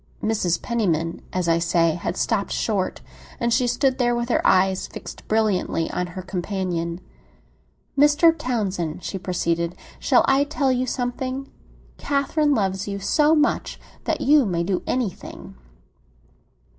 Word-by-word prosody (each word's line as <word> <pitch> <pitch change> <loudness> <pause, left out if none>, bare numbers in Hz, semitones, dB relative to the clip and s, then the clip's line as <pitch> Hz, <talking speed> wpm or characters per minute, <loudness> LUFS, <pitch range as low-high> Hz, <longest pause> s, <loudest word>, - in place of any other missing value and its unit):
Mrs. 195 -6 +1
Penniman, 170 -8 -1
as 180 -2 -1
I 165 0 +3
say, 170 0 +2
had 170 +2 -4
stopped 210 -4 0
short; 200 -4 -1 0.4
and 235 0 +1
she 250 0 +2
stood 260 +2 +1
there 240 -1 +2
with 240 0 -2
her - - +2
eyes 190 0 +3
fixed - - -10
brilliantly 210 -6 0
on 180 - -2
her 185 - -4
companion. 180 -2 -3 1.0
"Mr. 295 +4 +5
Townsend," 200 - -2
she 195 - -4
proceeded, 170 -2 -1 0.2
"shall - - +4
I 270 +1 +4
tell 285 -3 0
you 255 0 0
something? 255 +2 -3 0.5
Catherine 290 +1 +1
loves 190 -3 -1
you 200 0 -3
so 300 +10 +3
much 300 0 0 0.3
that - - -1
you 290 0 +5
may 170 -2 0
do 185 +1 -1
anything." 245 -8 -4
210 Hz, 140 wpm, -23 LUFS, 180-255 Hz, 1.0 s, Mr